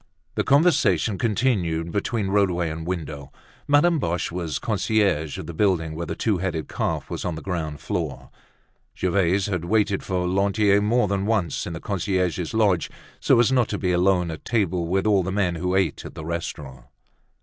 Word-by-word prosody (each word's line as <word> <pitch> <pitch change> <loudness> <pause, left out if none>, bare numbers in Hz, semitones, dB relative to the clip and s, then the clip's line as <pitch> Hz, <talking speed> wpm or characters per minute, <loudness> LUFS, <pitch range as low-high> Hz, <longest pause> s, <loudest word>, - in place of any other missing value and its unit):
The - - 0
conversation 140 - +3
continued 95 -8 0
between 100 +1 -1
roadway 90 -5 +1
and 80 +1 -6
window. 75 -6 -5 0.4
Madame 150 +3 +4
Boche 85 -6 -1
was 85 -5 -3
concierge 100 - 0
of - - -6
the 85 - -7
building 80 -3 +1
where 85 +2 -5
the - - -3
"Two 105 -5 0
Headed 85 -4 -2
Calf" - - -2
was - - -4
on 90 -3 -2
the 80 - -7
ground 80 -6 -3
floor. - - -4 0.7
Gervaise 95 +1 +1
had 90 -5 -2
waited 100 0 +1
for 90 -2 -2
Lantier 100 +2 +2
more 115 +2 +2
than 100 0 -1
once 95 -9 0
in 85 - -5
the 80 - -5
concierge's 90 -2 -1
lodge, 100 -7 +2 0.3
so - - +4
as 120 +2 +4
not 125 -3 +3
to 105 - -3
be 90 -3 0
alone 90 -1 +2
at 80 - -8
table 90 -7 0
with 95 +3 0
all 105 -3 +4
the 95 +1 -3
men 95 -3 +1
who 90 +2 -1
ate 95 -6 0
at - - -10
the 80 - -7
restaurant. 75 -5 -6
95 Hz, 185 wpm, -24 LUFS, 85-105 Hz, 0.7 s, Madame